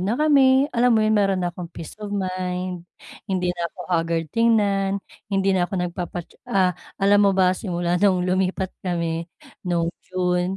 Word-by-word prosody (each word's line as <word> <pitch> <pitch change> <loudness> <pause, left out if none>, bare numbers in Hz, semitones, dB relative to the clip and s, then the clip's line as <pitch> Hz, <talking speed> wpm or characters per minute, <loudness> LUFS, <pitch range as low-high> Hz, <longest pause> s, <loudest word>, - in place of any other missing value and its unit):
na 200 +6 0
kami 275 -3 +5
alam 240 -1 +3
mo 215 - +3
'yon, 215 - +2
meron 195 -2 +2
na 175 - -2
akong 175 -1 -7
peace 165 -2 -9
of 210 - -5
mind, 185 -2 -3 0.4
hindi 180 -2 0
na 170 -1 -3
ako - - -33
hagard 165 -1 +1
tingnan, 205 -4 +2 0.3
hindi 195 -1 +1
na 180 -2 +1
ako - - -22
nagpapa 175 -1 -3 0.2
ah, 185 -2 +3 0.2
alam 205 +1 +4
mo 200 -2 +3
ba 185 -1 +4
simula 175 -2 -2
nung 185 -3 +3
lumipat 185 0 0
kami 170 -2 -2 0.4
no 170 -1 0 0.2
June 180 0 0
185 Hz, 170 wpm, -23 LUFS, 175-200 Hz, 0.4 s, kami